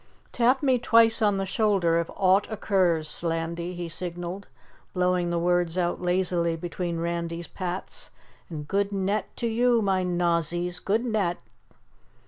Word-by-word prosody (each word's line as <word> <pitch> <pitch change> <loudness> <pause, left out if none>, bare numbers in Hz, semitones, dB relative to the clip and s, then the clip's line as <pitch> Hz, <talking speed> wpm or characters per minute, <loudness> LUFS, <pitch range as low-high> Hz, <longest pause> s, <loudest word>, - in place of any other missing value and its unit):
"Tap 250 +3 +2
me 260 -3 +3
twice 230 -1 +4
on 205 -2 +3
the 195 - -1
shoulder 190 -5 +2
if 170 - -3
aught 190 +1 +3
occurs, 180 -7 +1
Slandy," 170 +2 -2
he 175 -1 -4
signaled, 175 +3 -5 0.5
blowing 180 -1 +1
the 170 - 0
words 175 0 +1
out 175 -1 0
lazily 175 -2 0
between 175 +1 -4
Randy's 170 0 -3
pats. 185 +1 -6 0.4
"And 150 -3 -6
good 200 +2 0
net 200 +2 -1
to 235 - -2
you, 240 +1 +3
my 190 -2 +1
Nozzies! 175 0 0
Good 220 +5 +1
net!" 205 -7 0
180 Hz, 140 wpm, -26 LUFS, 170-200 Hz, 0.5 s, twice